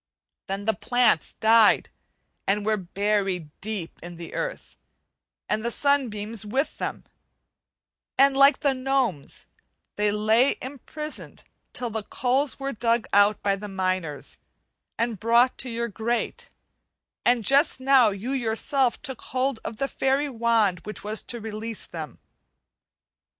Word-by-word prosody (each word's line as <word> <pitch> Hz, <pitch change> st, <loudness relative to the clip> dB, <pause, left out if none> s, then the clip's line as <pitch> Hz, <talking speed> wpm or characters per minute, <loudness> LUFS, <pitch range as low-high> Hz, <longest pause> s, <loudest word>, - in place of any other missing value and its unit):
Then 195 Hz, +1 st, -4 dB
the 220 Hz, -, +2 dB
plants 240 Hz, -3 st, +2 dB
died 220 Hz, -1 st, +4 dB, 0.6 s
and 205 Hz, +1 st, +1 dB
were 215 Hz, 0 st, +2 dB
buried 195 Hz, -3 st, -1 dB
deep 200 Hz, -5 st, -5 dB
in 175 Hz, 0 st, -8 dB
the 170 Hz, 0 st, -9 dB
earth -, -, -5 dB, 0.7 s
and 215 Hz, -, -1 dB
the 235 Hz, -, 0 dB
sunbeams 230 Hz, -6 st, 0 dB
with 260 Hz, +8 st, -2 dB
them; -, -, -4 dB, 1.1 s
and 275 Hz, 0 st, +5 dB
like 275 Hz, +1 st, +6 dB
the 280 Hz, -3 st, +2 dB
gnomes 255 Hz, -, -1 dB, 0.5 s
they 210 Hz, 0 st, +2 dB
lay 220 Hz, +5 st, +3 dB
imprisoned 290 Hz, +3 st, -8 dB, 0.3 s
till 240 Hz, -2 st, -4 dB
the 220 Hz, 0 st, -2 dB
coals 260 Hz, +7 st, 0 dB
were 275 Hz, 0 st, -3 dB
dug 230 Hz, +1 st, +1 dB
out 205 Hz, +1 st, +4 dB
by 200 Hz, -1 st, +2 dB
the 205 Hz, +1 st, -7 dB
miners, 185 Hz, -6 st, -3 dB, 0.6 s
and 230 Hz, -3 st, -1 dB
brought 235 Hz, +3 st, +4 dB
to 255 Hz, -, -2 dB
your 235 Hz, 0 st, -2 dB
grate; 235 Hz, -, -3 dB, 0.7 s
and 240 Hz, -3 st, +2 dB
just 280 Hz, +1 st, +3 dB
now 260 Hz, -3 st, +5 dB
you 205 Hz, +6 st, -4 dB
yourself 250 Hz, +1 st, +1 dB
took 265 Hz, -5 st, -4 dB
hold 260 Hz, -1 st, -1 dB
of 220 Hz, -, -6 dB
the 275 Hz, -, -1 dB
fairy 275 Hz, +2 st, 0 dB
wand 225 Hz, -6 st, +2 dB
which 210 Hz, +5 st, -8 dB
was 215 Hz, +1 st, 0 dB
to 240 Hz, -, -4 dB
release 220 Hz, 0 st, -5 dB
them. 160 Hz, -3 st, -8 dB
230 Hz, 135 wpm, -25 LUFS, 205-260 Hz, 1.1 s, like